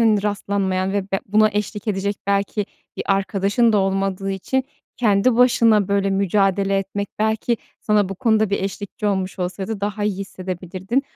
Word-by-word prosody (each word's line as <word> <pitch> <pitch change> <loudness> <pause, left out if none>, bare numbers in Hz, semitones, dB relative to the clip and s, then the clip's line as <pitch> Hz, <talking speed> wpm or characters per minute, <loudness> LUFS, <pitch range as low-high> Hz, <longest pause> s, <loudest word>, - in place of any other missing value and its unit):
hani 215 -3 +4
rastlanmayan 195 -2 -1
ve 200 -1 0
be 195 - +1
buna 215 +2 +4
eşlik 210 +1 -3
edecek 200 0 -1
belki 200 +1 0 0.3
bir - - -2
arkadaşın 195 +3 +2
da 210 - +4
olmadığı 195 0 0
için 255 +7 -1 0.3
kendi 225 +1 +3
başına 230 -5 +4
böyle 200 0 +1
mücadele 195 0 +2
etmek 195 +1 -3
belki 220 +2 +1 0.2
sana 210 -3 +2
bu 195 - -4
konuda 220 0 +2
bir 200 - 0
eşlikçi 205 +1 -4
olmuş 190 -1 -1
olsaydı 190 +3 -3
daha 205 +1 -2
iyi 205 -2 -1
hissedebilirdin 185 +4 -3
200 Hz, 155 wpm, -21 LUFS, 195-210 Hz, 0.3 s, hani